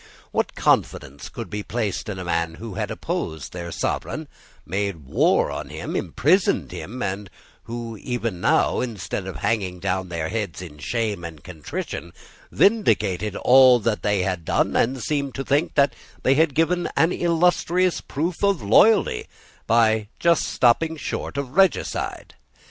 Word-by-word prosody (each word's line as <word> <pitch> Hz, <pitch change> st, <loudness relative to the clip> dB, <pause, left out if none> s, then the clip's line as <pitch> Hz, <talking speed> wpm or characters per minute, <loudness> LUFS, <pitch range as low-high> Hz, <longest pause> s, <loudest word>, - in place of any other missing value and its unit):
What -, -, -1 dB
confidence 70 Hz, +2 st, 0 dB
could -, -, -7 dB
be 105 Hz, -, -4 dB
placed 105 Hz, -2 st, -3 dB
in 100 Hz, -, -4 dB
men 85 Hz, -1 st, -1 dB
who 110 Hz, +3 st, -8 dB
had -, -, -3 dB
opposed 80 Hz, -2 st, -4 dB
their 85 Hz, -1 st, -6 dB
sovereign, -, -, -3 dB, 0.4 s
made 95 Hz, -4 st, -3 dB
war -, -, +2 dB
on -, -, -5 dB
him, -, -, -5 dB
imprisoned 155 Hz, -, +1 dB
him, 125 Hz, +5 st, -6 dB
and 100 Hz, 0 st, -3 dB, 0.4 s
who, 115 Hz, 0 st, -5 dB
even 115 Hz, -5 st, -3 dB
now, -, -, +3 dB
instead 105 Hz, -5 st, -4 dB
of 95 Hz, -, -6 dB
hanging 95 Hz, +1 st, -1 dB
down 95 Hz, 0 st, -2 dB
their 80 Hz, -2 st, -3 dB
heads 105 Hz, -7 st, -3 dB
in 80 Hz, -5 st, -9 dB
shame 110 Hz, -, -2 dB
and 80 Hz, -3 st, -8 dB
contrition, 80 Hz, -4 st, -6 dB, 0.4 s
vindicated 105 Hz, -, +2 dB
all 130 Hz, -1 st, +6 dB
that 110 Hz, -1 st, -1 dB
they 105 Hz, -2 st, +1 dB
had 90 Hz, -3 st, -2 dB
done, -, -, +1 dB
and 125 Hz, 0 st, +1 dB
seemed 140 Hz, -1 st, -2 dB
to 135 Hz, -, -3 dB
think 145 Hz, +5 st, 0 dB
that 140 Hz, -1 st, +4 dB, 0.3 s
they 130 Hz, -, +4 dB
had 150 Hz, -1 st, +2 dB
given 175 Hz, +2 st, +1 dB
an 165 Hz, +2 st, +4 dB
illustrious 175 Hz, +1 st, +2 dB
proof 165 Hz, +6 st, -3 dB
of 200 Hz, -, +2 dB
loyalty 200 Hz, -, +4 dB, 0.4 s
by 110 Hz, -2 st, +3 dB
just 170 Hz, -2 st, +3 dB
stopping 160 Hz, +7 st, +2 dB
short 145 Hz, -, -4 dB
of 140 Hz, -3 st, -3 dB
regicide? 190 Hz, +5 st, +1 dB
115 Hz, 150 wpm, -23 LUFS, 95-145 Hz, 0.4 s, all